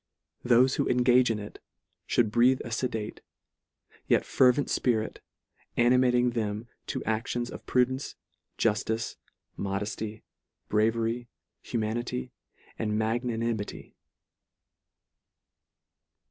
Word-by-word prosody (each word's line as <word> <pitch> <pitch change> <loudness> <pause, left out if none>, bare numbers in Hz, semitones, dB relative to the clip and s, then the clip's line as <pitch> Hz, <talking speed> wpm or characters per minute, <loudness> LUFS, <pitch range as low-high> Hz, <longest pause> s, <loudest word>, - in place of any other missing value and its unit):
Thofe 125 +2 +4
who - - +1
engage 125 0 +4
in 115 - 0
it, 105 0 -8 0.6
mould 110 -3 +4
breathe 125 +3 +4
a 120 - -6
fedate, 115 -3 -3 0.9
yet - - +3
fervent 130 +2 +4
lpirit, 110 -3 0 0.6
animating 125 0 +4
them 110 -1 -2 0.2
to - - -3
actions 120 +2 -2
of - - -10
prudence, 130 +2 +1 0.4
juftice, 110 +1 0 0.4
modefty, 105 +2 -3 0.5
bravery, 115 +2 +1 0.4
hu - - 0
manity, 110 - -2 0.5
and 105 -1 0
magnanimity. 115 -1 -2
115 Hz, 90 wpm, -28 LUFS, 110-125 Hz, 0.9 s, Thofe